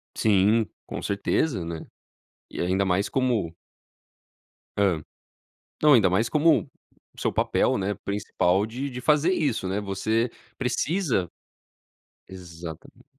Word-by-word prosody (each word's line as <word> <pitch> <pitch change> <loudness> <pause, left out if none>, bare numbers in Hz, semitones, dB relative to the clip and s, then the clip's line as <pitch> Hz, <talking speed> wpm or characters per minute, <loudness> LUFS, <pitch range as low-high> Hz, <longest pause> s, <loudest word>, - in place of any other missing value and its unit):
Sim, 105 +2 +3 0.2
com - - -5
certeza, 100 - 0
né? 85 -1 -6 0.6
E - - -8
ainda 95 +3 +1
mais 95 +2 +1
como 120 -11 0 1.2
Hã. 95 -6 +2 0.8
Não, 150 -1 +7
ainda 110 -7 +5
mais 95 +6 +1
como, 150 -5 +4 0.5
o - - -12
seu - - 0
papel, - - +1
né, 100 +1 -1
principal 100 -2 +1
de 125 +6 -4
de 125 -2 -6
fazer 150 +6 +3
isso, 140 - 0
né, 95 +2 -1
você 110 +4 0 0.3
precisa. 130 - 0 1.0
Exatamente. 85 -3 -10
105 Hz, 120 wpm, -25 LUFS, 95-125 Hz, 1.2 s, Não